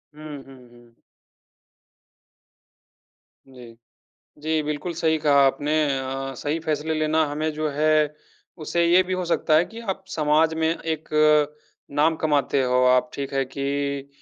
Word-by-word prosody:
हुँ, 150 -2 -9
हुँ, 130 -2 -15
हुँ। 120 -1 -20 2.5
जी। 125 -3 -14 0.6
जी, 155 +1 -1
बिल्कुल 150 +4 -4
सही 160 -1 +1
कहा 145 -2 +3
आपने। 145 +3 -1 0.3
अ, 135 0 -4
सही 150 +3 -2
फैसले 155 +1 -1
लेना 155 0 +1
हमें 150 +2 -2
जो 155 0 -2
है 150 0 +2 0.5
उससे 170 +2 +1
ये 175 +2 +5
भी 185 0 -5
हो 185 -1 -1
सकता 165 -2 +1
है 165 - +4
कि 230 +4 -11
आप 190 0 -5
समाज 155 -1 +2
में 160 0 0
एक 160 -2 -5 0.8
नाम 150 +3 +2
कमाते 145 -3 +1
हो 125 0 +2
आप, 125 +4 +3
ठीक 140 -1 -5
है 135 0 +1
कि 140 +1 -3
150 Hz, 145 wpm, -23 LUFS, 140-160 Hz, 2.5 s, ये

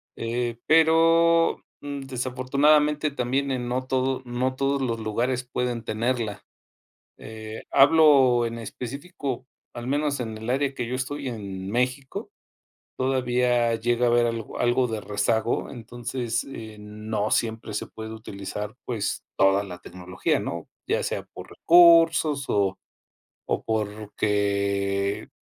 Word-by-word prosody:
eh, 120 0 -2
pero, 165 +1 +4 0.2
desafortunadamente 140 +2 +1
también 135 +1 -1
en 125 -2 -2
no 125 +1 -2
todo 130 0 0
no 125 +2 -1
todos 140 +1 0
los 115 -3 -1
lugares 120 +4 -1
pueden 120 -2 -2
tenerla, 115 -1 -2 0.8
eh, 110 0 -8
hablo 135 -4 +6
en 115 0 -5
específico, 130 - -6 0.3
al 120 0 -6
menos 145 +1 0
en 110 -2 -4
el 110 +2 -5
área 135 +1 0
que 120 -2 -3
yo 125 - -3
estoy 135 +1 -4
en 100 -5 -6
México, 125 +3 -2 0.7
todavía 125 -2 +1
llega 120 +2 +1
a - - +4
haber 120 0 +4
algo 115 -2 -5
algo 120 +1 +2
de 110 -2 -4
rezago. 110 +3 0
Entonces, 120 0 -4
eh, 110 -5 -9
no 105 0 -3
siempre 110 -1 -1
se 100 - -3
puede 110 0 -8
utilizar, 105 0 -6
pues 115 -5 -2
toda 95 +1 +4
la 90 -3 -8
tecnología, 90 +1 -2
¿no?, 85 -1 -5 0.2
ya - - +1
sea - - -2
por - - -10
recursos 165 -4 +5
o 100 -2 +1 0.7
o - - 0
porque 100 -2 -1
120 Hz, 125 wpm, -25 LUFS, 110-135 Hz, 0.8 s, hablo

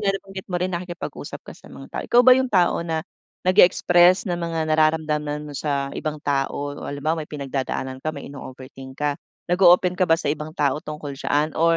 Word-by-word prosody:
nga, 205 - 0
nabanggit 195 -1 -7
mo 180 - 0
rin, 185 +1 -1
nakikipag-usap 175 0 -6
ka - - -9
sa - - -17
mga - - -11
tao. - - -3
Ikaw 240 - +5
ba 255 - +9
yung 260 0 +1
tao 180 -4 +3
na 160 -1 -3 0.4
nagi-express 180 -1 +5
ng 175 - -1
mga 165 -1 -3
nararamdaman 155 -1 +1
mo 150 - -8
sa 140 -1 -2
ibang 155 0 -3
tao 135 -1 0 0.2
o - - -8
halimbawa, 155 +3 -2
may 150 - -11
pinagdadaanan 135 -2 -4
ka, - - -2
may - - -9
ino-overthink 130 -1 -10
ka, 145 -1 0 0.4
nag-o-open 180 0 +5
ka 185 -2 +2
ba 165 - +5
sa 145 -3 -1
ibang 155 +1 -7
tao 145 0 +1
tungkol 150 -2 -7
diyan 145 +3 0
or 165 +1 +3
155 Hz, 200 wpm, -23 LUFS, 145-175 Hz, 0.4 s, ba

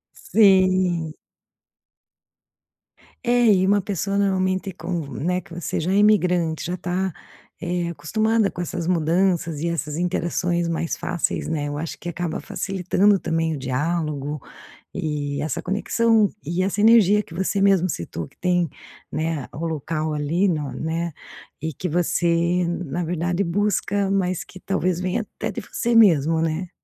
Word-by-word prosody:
Sim. 185 -5 +3 2.1
É 240 0 +3
e 190 -1 +3
uma 205 +1 +4
pessoa 195 0 -2
normalmente 190 -1 +1
com 170 -2 -4
né, 180 +4 -1
que 170 - -15
você 170 -1 -3
já 175 +4 -1
é 195 - +2
imigrante 180 -6 +3
já 180 +2 -2
tá, 180 +1 -2 0.5
é 175 0 -1
acostumada 215 +6 +1
com 175 - -7
essas 170 0 -4
mudanças 170 -2 +1
e 170 - -1
essas 155 -3 -3
interações 175 0 0
mais 165 0 -2
fáceis, 175 -2 -2
né? 150 -2 -1
Eu 145 0 -4
acho 160 +2 -5
que 175 - -7
acaba 170 -1 -3
facilitando 195 +1 +1
também 165 -2 -1
o - - -6
diálogo 145 +1 -2 0.5
e 145 -2 -3
essa 155 -3 -2
conexão, 215 +3 +2 0.2
e 170 +4 -1
essa 200 +2 0
energia 210 -2 +6
que 165 - -12
você 190 +2 0
mesmo 195 -2 +4
citou 85 - -5
que - - -25
tem, 175 -1 +1 0.4
né, 155 -3 -2
o 165 +3 -3
local 155 0 -2
ali, 165 +7 +1
no 150 -6 -1
né 165 +3 -3 0.5
e 160 0 -2
que 180 +6 -4
você 175 +1 +1
na 175 -1 -3
verdade 175 +3 -1
busca, 200 +1 0
mas 185 -2 0
que 185 - -13
talvez 185 -2 -1
venha 185 +5 -1
até - - -5
de - - -5
você 235 -1 -2
mesmo, 165 -8 +5
né? 165 +2 -1
175 Hz, 150 wpm, -23 LUFS, 160-190 Hz, 2.1 s, energia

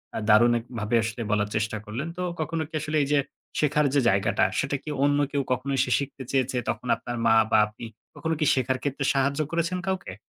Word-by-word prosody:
আ - - -1
দারুণ 120 +3 +6
এক 115 - -12
ভাবে 105 +2 0
আসলে 115 +2 -4
বলার 105 -1 +1
চেষ্টা 110 0 -1
করলেন। 120 +8 -4
তো - - -3 0.2
কখনো 160 +1 -2
কি - - -37
আসলে 155 0 -1
এই - - -2
যে 145 - +4 0.4
শেখার 150 0 +2
যে 145 - +4
জায়গাটা, 95 -1 +2
সেটা 140 +1 -1
কি - - -7
অন্য 145 0 +3
কেউ 140 - 0
কখনো 130 +2 -1
এসে 125 - +1
শিখতে 140 -1 -6
চেয়েছে? 130 -1 0
তখন 125 - -3
আপনার 120 - -6
মা 110 - +5 0.2
বা - - +5
আপনি 110 +2 -10 0.3
কখনো 160 - -2
কি 155 - +2
শেখার 130 0 0
ক্ষেত্রে 140 0 -2
সাহায্য 140 +1 +1
করেছেন 170 +2 0
কাউকে? 190 - -2
135 Hz, 215 wpm, -26 LUFS, 115-150 Hz, 0.4 s, দারুণ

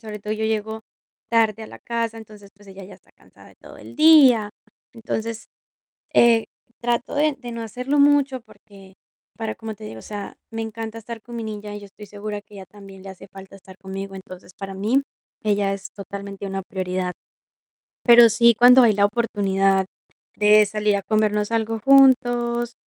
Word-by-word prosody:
sobre 215 -2 -8
todo, 210 +1 -5
yo 220 0 -3
llego 220 0 -2 0.5
tarde 225 -2 +1
a - - -8
la - - -12
casa, 230 -1 -3
entonces, 210 -2 -14
pues 205 0 -21
ella 195 0 -11
ya 190 - -13
está - - -24
cansada - - -20
de - - -20
todo - - -15
el - - -13
día. 275 -9 +6 0.4
Entonces, 225 -1 -5 0.7
eh, 230 -1 +4 0.3
trato 240 0 -2
de 295 0 +1
de 245 -2 -8
no 230 0 -6
hacerlo 250 +6 -1
mucho, 280 -2 +3
porque 195 -4 -18 0.4
para 220 -1 -4
como 220 -1 -7
te - - -13
digo, 110 +1 -9
o - - -16
sea, 205 -1 -7 0.2
me 225 0 -4
encanta 225 0 -6
estar 225 0 -9
con 240 +1 -10
mi 230 - -5
niña, 210 -1 -7
y - - -8
yo 205 - -11
estoy 210 +1 -14
segura 205 +1 -6
que 205 0 -20
a - - -10
ella 190 - -10
también 195 -1 -14
le 195 - -8
hace 190 +1 -13
falta 195 0 -13
estar 190 -1 -16
conmigo, 195 0 -7
entonces, 185 -1 -12
para 195 -1 -7
mí, 220 +8 +1 0.4
ella 205 -2 +1
es 195 -1 -7
totalmente 200 0 -8
una 195 0 -4
prioridad. 185 -1 -4 0.9
Pero 235 -1 +8
sí, 235 +2 +4
cuando 250 +1 +7
hay 225 -3 +4
la 200 0 +3
oportunidad 195 -3 0 0.5
de 210 0 +5
salir 210 0 0
a 200 - -3
comernos 210 0 0
algo 225 0 -1
juntos, 245 -2 +3
215 Hz, 190 wpm, -22 LUFS, 200-235 Hz, 0.9 s, Pero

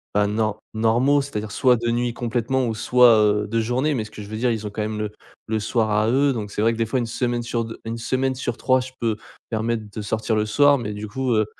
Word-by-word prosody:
bah, 105 0 +3
nor 110 0 -1 0.2
normaux, 120 +6 +3
c'est-à-dire 110 -6 -5
soit 125 +2 +4
de 120 0 -2
nuit 120 0 0
complètement 120 +2 -1
ou 110 - -2
soit, 120 +1 +5
heu, 105 -1 +2
de 115 +2 0
journée. 130 +6 0
Mais 110 - -1
ce 105 - -13
que 105 - -9
je 100 - -9
veux 110 - -5
dire 120 +1 +1
ils 110 -2 -3
ont - - -4
quand 105 +1 -4
même 110 0 -3
le 105 -1 -3 0.4
le 110 0 0
soir 110 +1 0
à 105 +1 +2
eux. 140 +2 +3
Donc 105 -4 -5
c'est 105 - -2
vrai 115 +1 +4
que - - -6
des 115 - +1
fois 120 +4 -1
1 120 - -2
semaine 120 +1 -1
sur 115 -1 -2
2, 115 - -9
une 115 +1 -4
semaine 130 +3 -1
sur 125 -2 -3
3 130 0 +3
je 130 0 -6
peux 115 -2 0 0.3
permettre 115 0 -1
de 110 - -6
sortir 110 +2 -1
le 105 0 +1
soir, 145 +6 +4
mais 105 -4 -4
du 105 +1 -6
coup, 130 +3 -1
heu, 110 -1 +3
115 Hz, 275 wpm, -23 LUFS, 110-125 Hz, 0.4 s, soit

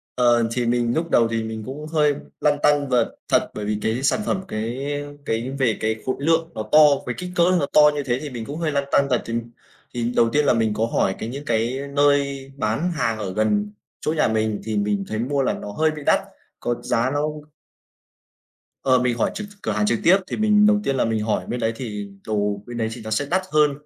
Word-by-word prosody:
Ờ, 120 -2 +3
thì 120 +1 -1
mình 120 0 +1
lúc 165 +1 -1
đầu 115 -6 +4
thì 115 -1 -1
mình 110 0 -5
cũng 150 +5 -7
hơi 150 -2 +2 0.3
lăn 145 -1 +2
tăn 145 -2 +3
vật 120 -3 +1
thật, - - +2
bởi 105 - -5
vì 105 0 -1
cái 115 +4 -1
sản 140 - +2
phẩm 190 -1 0
cái 120 +4 -3 0.4
cái 115 +3 -2
về 120 -5 +2
cái 110 0 0
khối 130 - 0
lượng 165 +3 +1
nó 110 - -3
to, 155 - +7 0.3
với 125 - -3
kích 180 0 -5
cỡ 170 - +4 0.2
nó 145 - +1
to 150 - +7
như 145 - -2
thế 125 -2 -1
thì 150 - -5
mình 120 -3 -6
cũng 145 +5 -6
hơi 165 -2 -1
lăn 140 -1 0
tăn 140 - +4
thật. 125 -3 +2
Thì 115 - -5 0.6
thì 120 0 -1
đầu 115 -1 +4
tiên 150 +4 +2
là - - +4
mình 115 -2 +1
có 110 +2 0
hỏi 95 -4 0
cái 110 - -4
những 140 +3 -7
cái 120 +2 0
nơi 140 -1 +1
bán 140 +9 0
hàng 115 -9 -1
ở 100 -3 -4
gần 105 0 +1 0.3
chỗ 155 - 0
nhà - - +3
mình 110 -1 0
thì 110 0 -2
mình 100 -1 0
thấy 110 - -3
mua 140 +4 0
là 130 - +1
nó 105 - -7
hơi 155 +8 +1
bị 155 -1 -7
đắt, - - +4 0.4
có 120 - -1
giá 120 +2 +1
nó 145 - 0 1.6
Ờ, 130 -2 +4
mình 125 -1 0
hỏi - - +1
trực 210 - -5 0.2
cửa 110 - -1
hàng 105 0 +1
trực 115 +1 +1
tiếp 185 +4 +6
thì - - -4
mình 210 -1 +4
đầu 210 0 +4
tiên 135 - 0
là 130 - +1
mình 110 -1 -1
hỏi 110 - -1
bên 125 - -3
đấy 115 0 0
thì 105 -5 -5 0.2
đồ 105 -2 -1
bên 120 0 -7
đấy 110 -1 -1
thì 120 - -9
nó 110 - -6
sẽ 145 +7 +1
đắt 185 - +3
hơn 150 -1 +4
120 Hz, 245 wpm, -22 LUFS, 110-145 Hz, 1.6 s, to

